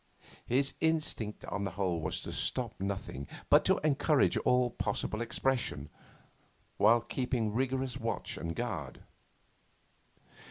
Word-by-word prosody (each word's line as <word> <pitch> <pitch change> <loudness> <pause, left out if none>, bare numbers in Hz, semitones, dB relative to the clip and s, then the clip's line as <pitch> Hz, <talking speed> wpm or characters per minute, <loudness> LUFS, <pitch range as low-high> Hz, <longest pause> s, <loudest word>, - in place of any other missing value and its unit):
His 135 +3 +2
instinct 155 -9 0
on 100 - -3
the 100 - -1
whole 90 -4 0
was 80 - -1
to - - -6
stop 120 -4 -1
nothing, 95 -8 -4 0.2
but - - +7
to - - +4
encourage 150 -1 +3
all 125 -1 +3
possible 110 0 -2
expression, 120 - -1 0.9
while 115 +3 +5
keeping 120 -2 -1
rigorous 130 +1 -1
watch 115 0 -2
and 85 0 -4
guard. 95 - -4
115 Hz, 120 wpm, -32 LUFS, 100-130 Hz, 0.9 s, but